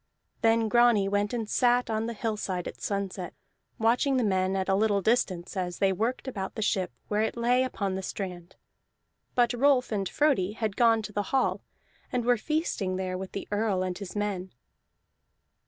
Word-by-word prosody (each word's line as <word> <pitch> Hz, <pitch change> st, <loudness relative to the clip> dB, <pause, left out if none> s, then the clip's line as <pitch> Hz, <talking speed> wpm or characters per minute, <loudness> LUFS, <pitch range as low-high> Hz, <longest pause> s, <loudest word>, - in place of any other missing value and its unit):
Then 225 Hz, 0 st, +3 dB
Grani 235 Hz, -3 st, +4 dB
went 205 Hz, +1 st, 0 dB
and 230 Hz, -3 st, -2 dB
sat 245 Hz, +2 st, +3 dB
on 220 Hz, 0 st, -1 dB
the 235 Hz, -, -4 dB
hillside 205 Hz, -5 st, -2 dB
at -, -, -9 dB
sunset, 195 Hz, -3 st, -3 dB, 0.4 s
watching 245 Hz, +5 st, +2 dB
the 250 Hz, -, +2 dB
men 190 Hz, -2 st, +1 dB
at 190 Hz, -1 st, -1 dB
a 195 Hz, -, +2 dB
little 205 Hz, 0 st, +2 dB
distance 195 Hz, -5 st, 0 dB
as 180 Hz, -2 st, -2 dB
they 195 Hz, -1 st, +2 dB
worked 230 Hz, +7 st, -2 dB
about 195 Hz, -7 st, -4 dB
the 220 Hz, -, -2 dB
ship 190 Hz, -, 0 dB, 0.2 s
where 210 Hz, 0 st, +1 dB
it 220 Hz, +2 st, -1 dB
lay 245 Hz, +2 st, +3 dB
upon 200 Hz, -7 st, -2 dB
the 190 Hz, -, -3 dB
strand; 180 Hz, -2 st, -6 dB, 0.8 s
but 240 Hz, 0 st, +3 dB
Rolf 255 Hz, 0 st, +3 dB
and 195 Hz, -3 st, -1 dB
Frodi 260 Hz, -11 st, +2 dB
had 220 Hz, -3 st, -2 dB
gone 230 Hz, -1 st, +4 dB
to 210 Hz, -, -7 dB
the 205 Hz, -, 0 dB
hall, 265 Hz, -1 st, +1 dB, 0.5 s
and 245 Hz, -2 st, -1 dB
were 245 Hz, 0 st, +5 dB
feasting 240 Hz, -, -1 dB
there 185 Hz, -1 st, -2 dB
with 190 Hz, 0 st, -6 dB
the 200 Hz, -, -5 dB
Earl 205 Hz, -3 st, +1 dB
and 185 Hz, -1 st, -2 dB
his 200 Hz, 0 st, -8 dB
men. 200 Hz, -3 st, -2 dB
210 Hz, 185 wpm, -28 LUFS, 190-235 Hz, 0.8 s, were